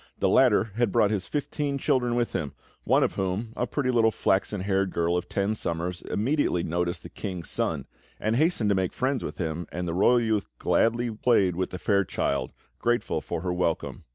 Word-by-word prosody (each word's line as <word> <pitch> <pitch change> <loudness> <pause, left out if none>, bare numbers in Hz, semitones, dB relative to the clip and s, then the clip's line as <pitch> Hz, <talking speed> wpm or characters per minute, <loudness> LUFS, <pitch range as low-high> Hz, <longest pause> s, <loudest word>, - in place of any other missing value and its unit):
The - - +2
latter 115 -4 +4
had 120 -4 +2
brought 100 +2 +3
his 100 -3 -2
fifteen 145 -1 -2
children 130 -4 +1
with 120 -1 0
him, 75 -3 -2 0.3
one - - +4
of - - 0
whom, 95 +4 -2
a 125 - -1
pretty 130 +1 0
little 115 -2 +4
flaxen 100 -1 0
haired 95 0 +1
girl 85 0 +1
of 90 0 -2
ten 100 +2 0
summers, 85 -3 -3
immediately 115 - 0
noticed 85 +1 -2
the - - -9
King's 90 -4 -5
Son, - - -1 0.3
and 110 +1 0
hastened 150 - +2
to - - +3
make 95 -1 0
friends 130 0 -1
with - - -5
him; 85 -1 -3
and 90 0 -3
the 85 - -2
royal 110 +7 +4
youth 110 -3 0
gladly 115 +1 +1
played 105 -5 +2
with 95 +1 -1
the 90 - -6
fair 100 +4 +2
child, 70 -5 -1 0.3
grateful 120 0 0
for 85 - -4
her 90 0 -1
welcome. 90 -2 -2
100 Hz, 200 wpm, -26 LUFS, 90-120 Hz, 0.3 s, latter